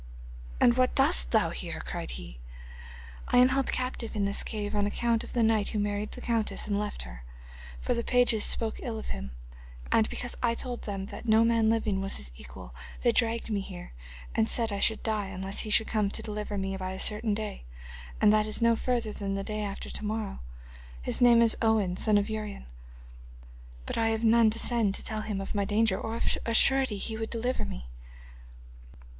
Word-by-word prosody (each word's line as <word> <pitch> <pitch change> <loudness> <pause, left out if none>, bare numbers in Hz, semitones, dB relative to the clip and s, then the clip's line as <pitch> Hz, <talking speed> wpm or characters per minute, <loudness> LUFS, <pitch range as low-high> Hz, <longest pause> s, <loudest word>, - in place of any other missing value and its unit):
'And 240 0 +4
what 255 0 +2
dost - - +4
thou - - +2
here?' 60 - -4
cried - - -5
he. - - -10 0.9
'I - - +2
am 250 +1 +7
held 270 0 0
captive 255 -3 -3
in 205 -1 0
this 200 0 +3
cave 210 -1 -3
on 205 -1 +1
account 230 +2 0
of - - -9
the 235 - +2
knight 220 -2 +2
who - - -3
married 205 0 -2
the - - -8
countess 230 -2 0
and 205 -1 -1
left 210 0 -4
her, - - -10 0.6
for - - -1
the 235 - -2
pages 245 -4 +3
spoke 225 -1 +1
ill 230 -3 -4
of 220 - -7
him, 65 0 -5 0.6
and 220 - +3
because 245 - -4
I 235 -1 +2
told 245 0 -4
them 195 -2 -4
that - - -8
no 220 +1 +5
man 230 -1 +3
living 215 -3 0
was 195 0 +1
his 65 -3 -2
equal - - -11 0.3
they - - +5
dragged 230 0 0
me 205 - 0
here 180 - -9 0.4
and 110 - +1
said 230 -2 +1
I 200 - -2
should 220 +2 +2
die 215 -3 -1
unless 190 +1 -4
he 215 - -2
should 220 +1 +4
come 215 -3 0
to - - -3
deliver 210 -1 -4
me 195 0 -2
by 185 0 -4
a 190 - -6
certain 210 0 +2
day, 210 - -5 0.5
and 210 - +5
that 215 0 +3
is 215 - 0
no 230 -1 +4
further 235 -2 -1
than 195 -1 -3
the 195 - -3
day 215 +1 -3
after 200 -1 -5
to - - -6
morrow. 215 -1 -3 0.6
His - - 0
name 235 -1 +7
is 230 - +3
Owen 220 -5 +2
the 180 - -4
son 215 -2 +4
of 205 0 +1
Urien, 215 - -5 1.2
but - - -3
I 225 - +2
have 225 0 -1
none 230 0 +5
to 220 - -2
send 230 -4 +3
to - - -4
tell 215 -1 -3
him 210 -2 -3
of 195 - -5
my 205 -1 0
danger, 210 -1 +1
or 225 0 -4
of - - 0
a 230 - -1
surety 265 -5 +4
he 220 +3 -4
would 225 0 -4
deliver 245 +2 -2
me. - - -7
215 Hz, 215 wpm, -28 LUFS, 200-230 Hz, 1.2 s, am